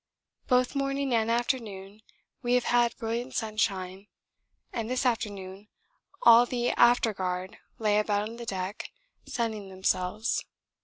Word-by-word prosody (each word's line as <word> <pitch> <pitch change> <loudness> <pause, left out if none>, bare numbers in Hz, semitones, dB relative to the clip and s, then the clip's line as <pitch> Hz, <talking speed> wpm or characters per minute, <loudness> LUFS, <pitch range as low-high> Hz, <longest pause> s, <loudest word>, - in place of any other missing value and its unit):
Both 250 -1 +3
morning 275 -1 -1
and 225 -1 +2
afternoon 220 -4 -2 0.4
we 245 -1 +2
have 250 - +2
had 240 -1 +2
brilliant 235 +3 -3
sunshine, 200 -3 -2 0.7
and 230 -1 -3
this 255 +1 -1
afternoon 205 -4 -2 0.6
all 235 +1 +8
the 245 -1 0
after 240 -2 +4
guard 185 -1 -4 0.2
lay 210 -2 +2
about 210 0 0
on 230 +1 -9
the 235 -1 -8
deck 190 +1 -4 0.4
sunning 220 -5 -3
themselves. 190 +2 -1
225 Hz, 125 wpm, -28 LUFS, 195-240 Hz, 0.7 s, all